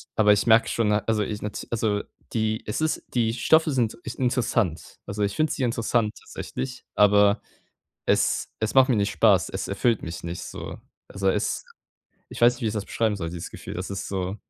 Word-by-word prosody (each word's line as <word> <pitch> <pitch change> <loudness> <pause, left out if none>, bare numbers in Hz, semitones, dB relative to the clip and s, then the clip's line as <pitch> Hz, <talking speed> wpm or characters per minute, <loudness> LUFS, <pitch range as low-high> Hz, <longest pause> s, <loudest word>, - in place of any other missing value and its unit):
aber 105 -1 +5
ich 105 - 0
merke 110 0 +6
schon, 115 -3 +1
na 105 0 +3
also, 110 -2 +2
ich 105 +1 -4
nat 105 0 -5
also, 105 -3 0 0.3
die 110 -1 0
es 105 +8 -3
ist 155 - 0
die 115 -2 +1
Stoffe 160 +6 +3
sind 120 -5 0
ich - - -7
interessant. 120 - 0
Also, 105 0 -3
ich 100 - -1
finde 155 0 +1
sie 135 - -2
interessant 115 -2 +1
tatsächlich, 130 -1 -6
aber 105 0 +5 0.7
es - - +2
es 110 +2 -1
macht 130 0 +6
mir 120 - +3
nicht 100 0 +1
Spaß. - - +3
Es - - -4
erfüllt 110 +3 +1
mich 85 0 -6
nicht, 85 +1 -5
so. - - -7 0.3
Also, 95 -1 -1
es - - 0 0.7
ich - - -9
weiß 120 +1 +6
nicht, - - -14
wie - - +2
ich 105 - -2
das 105 -1 -3
beschreiben 110 -2 0
soll 85 -4 -4
dieses 85 0 -6
Gefühl, - - -8
das 90 +2 -5
ist 100 - -4
so, 95 0 -3
110 Hz, 205 wpm, -25 LUFS, 100-120 Hz, 0.7 s, merke